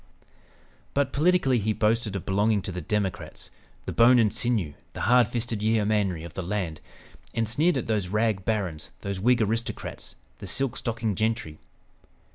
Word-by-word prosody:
But, 140 Hz, -1 st, +1 dB
politically, 150 Hz, -5 st, +3 dB
he 110 Hz, +1 st, 0 dB
boasted 110 Hz, -1 st, 0 dB
of 100 Hz, -, -4 dB
belonging 100 Hz, +1 st, +2 dB
to -, -, -4 dB
the 90 Hz, 0 st, -5 dB
Democrats, 100 Hz, +2 st, -3 dB, 0.3 s
"the -, -, -3 dB
bone 120 Hz, +2 st, +6 dB
and 110 Hz, -3 st, +3 dB
sinew, 110 Hz, -11 st, +1 dB, 0.2 s
the -, -, -6 dB
hard 125 Hz, -1 st, +5 dB
fisted 115 Hz, -2 st, -2 dB
yeomanry 105 Hz, -5 st, +1 dB
of 85 Hz, -2 st, -9 dB
the 95 Hz, -, -4 dB
land," 90 Hz, -4 st, -3 dB, 0.5 s
and 115 Hz, -1 st, +1 dB
sneered 150 Hz, +8 st, +2 dB
at 125 Hz, -, -2 dB
those 105 Hz, -4 st, 0 dB
"rag 105 Hz, 0 st, 0 dB
barons," 95 Hz, -8 st, -2 dB
those 100 Hz, -1 st, -4 dB
Whig 120 Hz, +3 st, +3 dB
aristocrats, 115 Hz, +2 st, -4 dB, 0.2 s
the -, -, -7 dB
"silk 135 Hz, -3 st, -1 dB
stocking 115 Hz, -2 st, -2 dB
gentry!" 110 Hz, -7 st, -2 dB
110 Hz, 160 wpm, -26 LUFS, 100-120 Hz, 0.5 s, bone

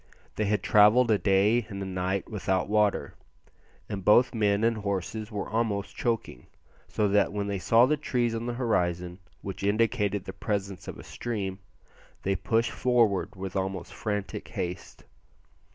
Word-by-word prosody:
They 110 Hz, -, 0 dB
had 105 Hz, +1 st, 0 dB
travelled 110 Hz, +3 st, +5 dB
a 105 Hz, -, +3 dB
day 105 Hz, +4 st, +3 dB
and 100 Hz, -2 st, -6 dB
a 95 Hz, -, -4 dB
night 95 Hz, +1 st, -2 dB
without 95 Hz, -3 st, -1 dB
water, 105 Hz, -1 st, +1 dB, 0.7 s
and 100 Hz, -3 st, -5 dB
both 120 Hz, +7 st, +5 dB
men 105 Hz, -2 st, +1 dB
and 115 Hz, 0 st, +2 dB
horses 105 Hz, +2 st, -3 dB
were 105 Hz, -2 st, -3 dB
almost 110 Hz, -3 st, -1 dB
choking, 115 Hz, -, -3 dB, 0.4 s
so 105 Hz, -, 0 dB
that 100 Hz, +1 st, +3 dB
when 100 Hz, 0 st, -2 dB
they 100 Hz, -1 st, -2 dB
saw 115 Hz, +6 st, +5 dB
the 150 Hz, +3 st, +1 dB
trees 120 Hz, -5 st, 0 dB
on 115 Hz, +1 st, -3 dB
the 120 Hz, -, -2 dB
horizon 90 Hz, -7 st, -1 dB, 0.2 s
which 95 Hz, -1 st, -6 dB
indicated 105 Hz, -1 st, +1 dB
the 95 Hz, -, -6 dB
presence 100 Hz, -4 st, -3 dB
of -, -, -6 dB
a -, -, -10 dB
stream, 100 Hz, -5 st, -4 dB, 0.6 s
they 95 Hz, 0 st, +1 dB
pushed 115 Hz, +4 st, 0 dB
forward 115 Hz, -7 st, +1 dB
with 95 Hz, -1 st, -6 dB
almost 95 Hz, -2 st, -3 dB
frantic 105 Hz, -4 st, -4 dB
haste. 90 Hz, 0 st, -6 dB
105 Hz, 160 wpm, -28 LUFS, 95-115 Hz, 0.7 s, travelled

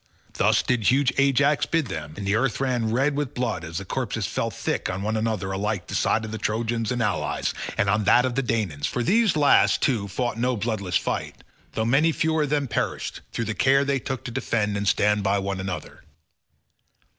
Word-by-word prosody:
Thus -, -, +2 dB
did 120 Hz, -4 st, 0 dB
huge 135 Hz, 0 st, +3 dB
Ajax 140 Hz, +1 st, +3 dB
bid 165 Hz, -3 st, +1 dB
them, 80 Hz, -7 st, -6 dB
and 100 Hz, -, -5 dB
the 100 Hz, -, +1 dB
earth 120 Hz, +3 st, +1 dB
ran 125 Hz, -4 st, 0 dB
red 135 Hz, +5 st, +1 dB
with 145 Hz, -3 st, -3 dB
blood 115 Hz, -9 st, -2 dB
as 85 Hz, 0 st, -6 dB
the 95 Hz, -, -4 dB
corpses -, -, -2 dB
fell -, -, -2 dB
thick -, -, -3 dB
on 95 Hz, +1 st, -3 dB
one 110 Hz, +1 st, -1 dB
another 110 Hz, -3 st, -1 dB
alike 100 Hz, +1 st, -1 dB
on -, -, -29 dB
the -, -, -5 dB
side 110 Hz, -, +1 dB
of 110 Hz, -, -7 dB
the 110 Hz, -, -5 dB
Trojans 115 Hz, +1 st, -1 dB
and 120 Hz, -1 st, 0 dB
allies, 105 Hz, -3 st, -1 dB, 0.2 s
and 100 Hz, -, +2 dB
on 105 Hz, +1 st, +1 dB
that 125 Hz, +4 st, +5 dB
of 130 Hz, -, -1 dB
the 135 Hz, -, +1 dB
Danaans; 105 Hz, -, -1 dB
for 125 Hz, -, -2 dB
these 220 Hz, -, +3 dB
last, 145 Hz, -2 st, +4 dB
too, 115 Hz, -8 st, +1 dB
fought 115 Hz, +3 st, -2 dB
no 125 Hz, 0 st, +1 dB
bloodless 100 Hz, -4 st, -1 dB
fight -, -, -4 dB, 0.3 s
though 110 Hz, -, -1 dB
many 140 Hz, +8 st, +3 dB
fewer 160 Hz, 0 st, 0 dB
of 150 Hz, -, 0 dB
them 145 Hz, -1 st, 0 dB
perished, 115 Hz, -, -3 dB
through 115 Hz, -, -2 dB
the 110 Hz, -, -2 dB
care 135 Hz, +4 st, +3 dB
they 140 Hz, -1 st, +1 dB
took 130 Hz, 0 st, -5 dB
to 120 Hz, -, -6 dB
defend 110 Hz, -4 st, -1 dB
and 100 Hz, 0 st, -2 dB
stand 105 Hz, +1 st, +3 dB
by 100 Hz, 0 st, +1 dB
one 100 Hz, -1 st, -2 dB
another. 95 Hz, -1 st, -6 dB
115 Hz, 215 wpm, -24 LUFS, 100-135 Hz, 0.3 s, that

